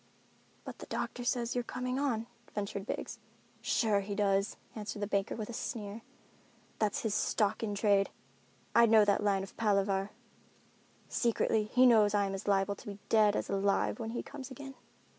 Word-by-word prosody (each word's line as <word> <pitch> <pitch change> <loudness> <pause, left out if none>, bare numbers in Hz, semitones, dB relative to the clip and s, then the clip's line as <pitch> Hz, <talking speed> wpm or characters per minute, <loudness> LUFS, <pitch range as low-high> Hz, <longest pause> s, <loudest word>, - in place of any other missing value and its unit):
"But - - -8
the - - -9
doctor 245 - -3
says 240 0 0
you're 245 - -1
coming 255 +2 -3
on," 240 -6 0 0.3
ventured 200 0 -3
Biggs. - - -4 0.4
"Sure 215 -4 +2
he 200 +1 -4
does," 200 0 +1 0.2
answered 210 -1 -5
the 205 - -1
banker 200 -1 -1
with 215 -2 -4
a 240 - -7
sneer. 215 -1 -5 0.8
"That's 210 -2 +1
his 220 -3 0
stock 210 0 +1
in 210 -3 -2
trade. 200 -1 +3 0.6
I 235 0 +6
know 220 -1 +6
that 205 0 +2
line 195 -2 +2
of 195 - -10
palaver. 200 -2 +1 1.0
Secretly, 225 -2 +1
he 250 +4 +4
knows 215 -4 +5
I 200 -1 +3
am 195 - -3
as 195 - -6
liable 195 0 +2
to - - -13
be 200 0 -7
dead 215 -2 +5
as - - -1
alive 200 +4 +1
when 225 -1 -3
he 235 - -3
comes 275 -2 -8
again." 270 +1 -8
210 Hz, 180 wpm, -32 LUFS, 200-235 Hz, 1.0 s, I